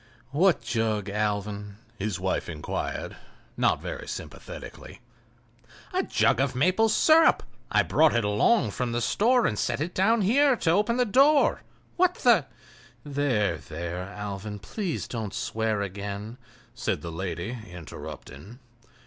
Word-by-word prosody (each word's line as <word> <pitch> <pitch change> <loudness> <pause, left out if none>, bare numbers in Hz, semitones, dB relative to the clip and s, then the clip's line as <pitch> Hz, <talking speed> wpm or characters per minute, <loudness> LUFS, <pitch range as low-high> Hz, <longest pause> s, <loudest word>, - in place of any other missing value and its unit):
"What 170 +4 +3
jug, 110 -3 -1
Alvan?" 105 0 -2 0.2
his 100 -2 -2
wife 95 -1 -1
inquired, 75 -2 -4 0.4
not - - +1
very - - -6
sympathetically. - - -8 0.9
"A - - +2
jug 125 - +2
of 135 -2 0
maple 185 - +3
sirup—I 320 +7 +3
brought 155 -4 +3
it 120 - +2
along 105 - +3
from 120 +2 -2
the 120 - 0
store 240 - +3
and 105 - 0
set - - -1
it 170 +4 -3
down 220 +4 +3
here 270 +7 +4
to 165 -7 +1
open 210 +6 +2
the 250 - +3
door. 275 +6 +4 0.4
What 360 0 +3
the—" - - +4 0.6
"There, 130 - 0
there, 85 +3 -5
Alvan, 105 +1 -6
please 180 - -4
don't 110 -5 -5
swear 110 -2 -1
again," 100 +4 -6 0.3
said 120 - -2
the 85 - -5
lady, 85 +6 -4
interrupting. 85 - -10
110 Hz, 130 wpm, -26 LUFS, -, 0.9 s, here